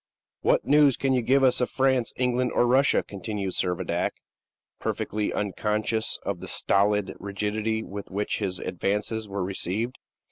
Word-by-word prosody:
"What - - +2
news 145 -2 +5
can 135 -1 +1
you 125 - +2
give 135 +4 +3
us 130 -1 +4
of 125 - +1
France, 130 -3 +1
England, 125 0 0
or - - +3
Russia?" 130 +3 +4
continued 100 -1 -4
Servadac, 90 -1 -1 0.7
perfectly 105 0 -2
unconscious 105 +2 -1
of 100 -3 -2
the - - -7
stolid 100 0 +2
rigidity 105 +2 -2
with 100 -1 -7
which 100 +2 -2
his 95 -3 -2
advances 105 +4 -2
were 100 -1 -2
received. 100 +6 -2
105 Hz, 145 wpm, -26 LUFS, 100-125 Hz, 0.7 s, news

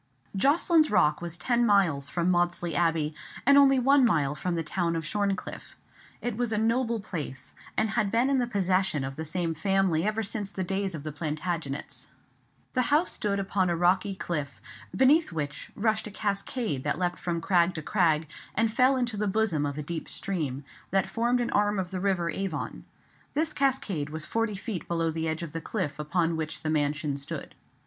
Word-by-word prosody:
Jocelyn's 310 - +4
Rock 155 -7 +3
was 170 -1 -5
ten 240 +6 +1
miles 185 -11 +3
from 175 +1 +1
Maudesley 175 -1 +1
Abbey, 160 -1 +1 0.3
and 280 +2 +7
only 275 -1 +6
one 270 +2 +5
mile 150 - +2
from 170 +4 -2
the 165 - -1
town 170 +1 -1
of 165 -1 -3
Shorncliffe. 200 +2 -3 0.5
It 245 -3 -2
was 240 0 -1
a 215 - 0
noble 230 +1 +1
place, 145 -9 -5 0.2
and 220 - +2
had 215 -2 +1
been 235 +3 +3
in 275 -1 +2
the 245 - 0
possession 190 - +1
of 135 0 -5
the 160 - -4
same 165 +1 -1
family 185 -1 +1
ever 215 +2 0
since 205 0 -1
the 190 - -3
days 195 0 -2
of 145 - -7
the 155 - -4
Plantagenets. 155 -1 -4 0.7
The 255 - +2
house 305 +5 +3
stood 200 -1 -1
upon 195 -1 0
a 170 - +1
rocky 185 +3 +2
cliff, 150 -6 -3 0.4
beneath 295 +5 +4
which 145 -3 -4
rushed 220 +1 0
a - - -6
cascade 200 - -2
that 145 - 0
leapt 175 -1 -1
from 170 -1 -2
crag 175 0 +2
to 155 - -4
crag, 160 -5 +2 0.3
and 225 +1 +1
fell 255 +3 +4
into 245 -4 -1
the 210 0 0
bosom 190 -8 +1
of 140 0 -5
a 150 - -3
deep 160 +2 -5
stream, 145 -8 -2 0.3
that 195 0 +1
formed 240 +2 +1
an 240 - -1
arm 205 0 +2
of 185 -1 -3
the 185 - -3
river 185 -3 0
Avon. 150 - -4 0.5
This 310 +1 0
cascade 220 - 0
was 155 0 -4
forty 225 -2 -1
feet 195 -4 -5
below 165 -1 0
the 160 0 -2
edge 160 +2 -2
of 165 - -6
the 165 +1 -4
cliff 155 -9 -3
upon 165 +2 0
which 155 -1 -2
the 155 - 0
mansion 145 -1 0
stood. 140 - -6
185 Hz, 195 wpm, -28 LUFS, 160-220 Hz, 0.7 s, and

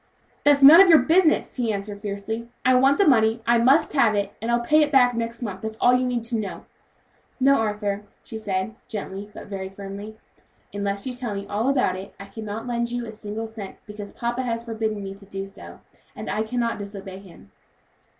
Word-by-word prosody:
"That's 285 -1 +4
none 315 +6 +11
of 390 - +6
your 325 - +9
business," 320 +4 +2
he 235 -3 0
answered, 200 0 -5
fiercely. 220 +3 -5 0.2
"I 255 - +5
want 270 +2 +4
the 400 - +3
money; 225 -3 +3
I 235 0 +4
must 265 +6 +4
have 235 -7 +3
it, 200 -1 -1
and 225 - -3
I'll 235 0 +3
pay 305 +6 +3
it 295 -1 +2
back 250 -3 +5
next 230 +1 -4
month, 195 -4 -5
and 220 - -3
that's 220 - -14
all 245 - +5
you 250 0 +3
need 245 -2 -1
to 230 0 -1
know." 205 -3 -6 0.7
"No, 275 +1 +5
Arthur," 210 -2 -1 0.2
she 220 - -8
said 195 0 -2
gently, 205 -2 -6
but - - -10
very 190 -1 -6
firmly, 200 +2 -8 0.6
"unless 200 0 -3
you 260 - -3
tell 245 -4 -4
me 200 0 -5
all 215 +6 -1
about 255 -9 +2
it, 190 +1 -10
I 200 - -8
cannot 215 +1 -7
lend 235 -1 -1
you 240 0 -3
a 220 - -7
single 215 +1 -6
cent, 220 -3 -8
because 210 -1 -8
papa 240 +2 -3
has 230 -2 -3
forbidden 220 -3 -3
me 195 0 -6
to 200 0 -16
do 195 0 -5
so, 195 - -12 0.3
and - - -5
I 215 - -1
cannot 230 0 -2
disobey 200 -2 -8
him." 175 - -16
220 Hz, 215 wpm, -24 LUFS, 200-245 Hz, 0.7 s, none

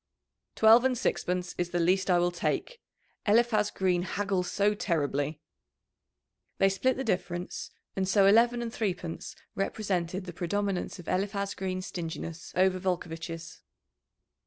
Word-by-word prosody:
"Twelve 225 +2 +7
and 260 -1 +2
sixpence 180 -4 -1
is 175 -1 0
the 175 - -1
least 185 +3 +2
I 180 - +5
will 175 0 +2
take. 475 - -2 0.5
Eliphaz 215 -1 +4
Green 180 -2 +1
haggles 190 -1 -1
so 205 +1 +2
terribly." 150 -6 -1 1.2
They 195 - +4
split 245 +7 +1
the 265 - -2
difference, 180 -5 -2 0.3
and 190 -1 0
so 195 0 +5
eleven 235 +4 +5
and 230 0 -5
threepence 180 -6 -3 0.2
represented 190 -3 -2
the 175 - -7
predominance 190 +2 -2
of 175 - -11
Eliphaz 200 +1 -1
Green's 185 -1 -3
stinginess 165 -2 -6
over 185 0 +3
Volcovitch's. 165 -2 -4
185 Hz, 135 wpm, -29 LUFS, 175-205 Hz, 1.2 s, Twelve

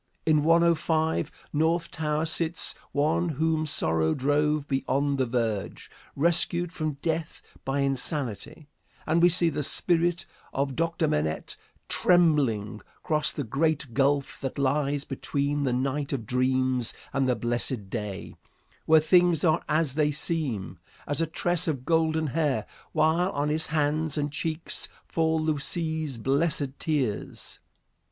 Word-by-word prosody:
In 155 -2 +3
105, 160 -1 +1
North 165 +3 +1
Tower, 155 0 -1
sits 165 +1 +1 0.2
one 160 +4 +1
whom 155 +1 0
sorrow 80 - +1
drove 145 +2 +1
beyond 140 +1 0
the 130 - +1
verge, 115 -4 -2 0.2
rescued 170 +2 +2
from 155 -3 -2
death 160 -1 -2 0.2
by 135 +1 -1
insanity, 140 0 -3 0.4
and 165 +2 +2
we 175 - +7
see 170 -1 +3
the 150 - -2
spirit 170 +3 +1 0.3
of 135 -1 -1
Dr. 165 0 0
Manette 80 - -1 0.3
tremblingly 140 - +2 0.2
cross 155 -1 +1
the 145 - -4
great 140 +1 -1
gulf 140 +2 +1
that 135 +1 -4
lies 140 +1 0
between 140 +1 -2
the 130 - +1
night 135 +3 -1
of 120 -5 -3
dreams 130 0 +1 0.2
and 135 -1 +1
the 125 - +2
blessed 120 -4 -3
day, 105 -4 -5 0.5
where 160 0 +7
things 175 0 +4
are 160 -3 +3
as 155 -3 +1
they 150 0 +2
seem, 135 - -3 0.3
as 145 +2 -1
a 165 - +1
tress 175 +2 +1
of 135 -5 -2
golden 160 -1 +2
hair, 150 -1 0 0.3
while 170 +4 +2
on 145 +1 0
his 155 +1 -1
hands 150 +1 0
and 145 -1 -1
cheeks 160 +2 -3 0.2
fall 160 -1 +1
Lucie's 155 -1 -2
blessed 140 +2 0
tears. 135 -10 -3
150 Hz, 135 wpm, -27 LUFS, 135-160 Hz, 0.5 s, we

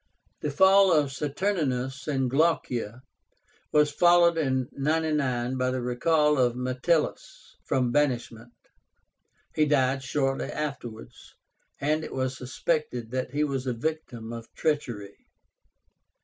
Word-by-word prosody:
The 150 - -2
fall 190 +5 +5
of 150 -4 +3
Saturnínus 140 -4 -2
and 135 -3 0
Glaucia 130 -5 0 0.7
was 150 -1 +4
followed 175 +1 +5
in 130 -5 0
99 140 -4 0
by 130 0 +1
the 130 0 -2
recall 150 +4 +2
of 120 -2 +2
Metellus 130 +6 -2
from 125 -2 +1
banishment. 120 -4 -1 1.0
He 155 - +3
died 135 -2 +2
shortly 135 +1 -1
afterwards, 135 -7 -7 0.4
and 155 +2 0
it - - -7
was 130 -1 -1
suspected 130 -2 -2
that 130 0 -2
he 145 +3 0
was 135 -3 -2
a 125 - 0
victim 120 -4 -4
of 115 -1 -9
treachery. 120 -11 -3
135 Hz, 120 wpm, -27 LUFS, 125-150 Hz, 1.0 s, fall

